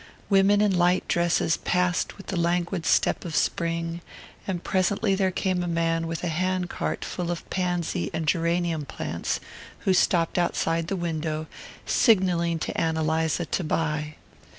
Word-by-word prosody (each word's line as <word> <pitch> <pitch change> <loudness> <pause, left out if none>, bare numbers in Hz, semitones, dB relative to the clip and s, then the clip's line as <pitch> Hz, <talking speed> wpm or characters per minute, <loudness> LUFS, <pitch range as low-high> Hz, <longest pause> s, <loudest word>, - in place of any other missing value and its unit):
Women 200 +1 +5
in 205 -3 +3
light 180 +1 +2
dresses 170 -1 +2
passed 180 0 0
with 195 - -11
the - - -4
languid 170 0 0
step - - +2
of 165 -3 -5
spring; 170 0 -1 0.5
and 180 -3 -3
presently 195 +2 +1
there 190 -1 +2
came 185 -1 -1
a 175 - -2
man 165 -1 0
with 165 +1 -4
a - - 0
hand 180 +2 -1
cart - - -3
full 175 -2 -4
of 175 -1 -4
pansy 175 - -1
and 160 0 -2
geranium 170 -1 +1
plants - - -3 0.4
who 190 - +2
stopped 175 -2 +2
outside 165 -1 0
the 195 - -1
window, 160 -3 -2 0.4
signalling 180 -7 +3
to - - -4
Ann 160 -1 0
Eliza 160 +1 0
to 180 - -2
buy. 150 -1 -1
170 Hz, 155 wpm, -26 LUFS, 165-185 Hz, 0.5 s, Women